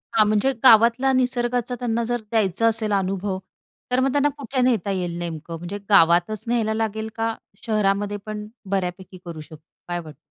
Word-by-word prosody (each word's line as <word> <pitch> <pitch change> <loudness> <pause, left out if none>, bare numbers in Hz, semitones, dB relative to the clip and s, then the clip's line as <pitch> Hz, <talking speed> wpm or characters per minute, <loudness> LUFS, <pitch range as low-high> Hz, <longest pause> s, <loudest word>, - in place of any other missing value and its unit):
हां, 215 -1 +5
म्हणजे 215 +5 +2
गावातला 235 +2 +6
निसर्गाचा 245 -1 0
त्यांना 235 -1 -1
जर 240 +1 -2
द्यायचा 220 -1 +2
असेल 220 -1 +1
अनुभव, 195 0 -1 0.5
तर 250 - +2
मग 265 +1 +2
त्यांना 290 +1 +2
कुठे 260 -1 -2
नेता 230 -6 +1
येईल 175 -3 -2
नेमकं? 165 -1 -5
म्हणजे 175 +4 -6
गावातच 175 +3 +4
न्यायला 230 -2 +1
लागेल, 220 0 -2
का 225 0 -1 0.3
शहरामध्ये 205 -2 0
पण 210 -1 -6 0.2
बऱ्यापैकी 185 -1 -3
करू 165 -2 -7
शकतो? 155 0 -13 0.3
काय 175 0 -2
वाटतं? 155 -3 -11
215 Hz, 165 wpm, -23 LUFS, 185-235 Hz, 0.5 s, गावातला